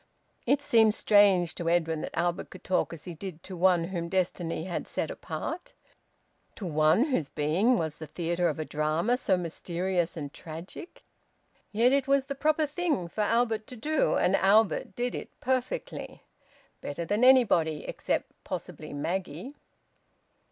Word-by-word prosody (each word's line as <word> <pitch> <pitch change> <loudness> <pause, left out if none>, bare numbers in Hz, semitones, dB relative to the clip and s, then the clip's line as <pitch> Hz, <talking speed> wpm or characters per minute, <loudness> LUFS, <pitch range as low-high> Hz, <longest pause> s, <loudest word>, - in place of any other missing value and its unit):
It 280 +3 +3
seemed 220 -5 +4
strange 200 -5 +4
to 170 -1 -2
Edwin 165 -2 +1
that - - -6
Albert 175 +1 -1
could 185 - -12
talk 185 - 0
as 165 -3 -9
he 180 - -7
did 175 0 -8
to 190 - -7
one 175 -1 +3
whom 170 -3 -3
destiny 175 -3 -1
had 175 0 -4
set - - -3
apart, 350 +2 -6 0.8
to 205 - -7
one 155 - +3
whose 175 - -1
being 185 +12 +2
was 160 -4 -2
the 155 - -8
theatre 170 +2 0
of 150 - -3
a 155 - -3
drama 155 +11 0
so 195 -7 +1
mysterious 175 +1 -2
and 145 -2 -6
tragic. 165 - -9 0.7
Yet 235 +5 +3
it 275 -1 +2
was 275 -1 +3
the 280 - -4
proper 305 +2 +1
thing 295 - -1
for 215 - -3
Albert 225 0 +1
to 255 - -8
do, 300 +6 +1
and 190 - +3
Albert 200 -1 +3
did 245 0 -1
it - - -8
perfectly, 260 - -3 0.6
better 155 +4 -4
than 205 +7 0
anybody, 200 - +4
except - - -2
possibly - - -6
Maggie. 180 - -4
185 Hz, 160 wpm, -28 LUFS, 165-240 Hz, 0.8 s, seemed